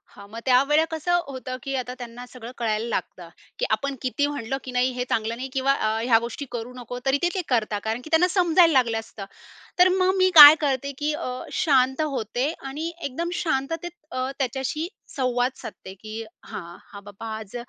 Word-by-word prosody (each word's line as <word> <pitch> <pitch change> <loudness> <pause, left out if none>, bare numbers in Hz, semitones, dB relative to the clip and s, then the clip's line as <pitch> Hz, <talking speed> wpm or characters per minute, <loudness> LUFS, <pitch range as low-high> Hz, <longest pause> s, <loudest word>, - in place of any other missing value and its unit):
हां, 200 - -12
मग 225 +2 -7
त्यावेळा 275 +4 +4
कसं 350 +2 +1
होतं 255 -2 -6
की 275 - -4
आता 250 -1 -3
त्यांना 245 0 -8
सगळं 245 -1 -9
कळायला 225 -1 -1
लागतं - - -4 0.3
की - - +1
आपण 280 0 -1
किती 285 +3 0
म्हणलं 270 -3 -3
की 255 - -7
नाही 250 +1 +1
हे 250 0 -3
चांगलं 225 +1 0
नाही 255 +3 -5
किंवा 270 +1 +2
अ, 245 - -1 0.2
ह्या 230 -2 +4
गोष्टी 240 +4 -6
करू 240 +1 -5
नको, 245 0 -7
तरी 270 +1 +3
ते, 350 - +3
ते 375 - 0
करतात, 215 -4 0
कारण 220 +2 -2
की 280 - -11
त्यांना 325 +2 +4
समजायला 350 -2 +5
लागलं 235 -4 +2
असतं. 220 -2 -9 0.5
तर 360 +1 +7
मग 370 0 +3
मी 370 0 +4
काय 295 -1 +13
करते 280 -1 0
की 300 +1 -1
अ, 300 - -4 0.3
शांत 265 -3 +3
होते 270 -1 -1
आणि 300 +5 -4
एकदम 330 +6 -3
शांततेत 330 +3 -2 0.2
अ, 255 0 -2
त्याच्याशी 265 +5 -2 0.3
संवाद 250 -2 +1
साधते, 190 - -9
की 215 +3 -7 0.2
हां, 170 -3 -8 0.2
हा 200 - -8
बाबा 205 +2 -7
आज 215 0 -10
260 Hz, 195 wpm, -24 LUFS, 230-295 Hz, 0.5 s, काय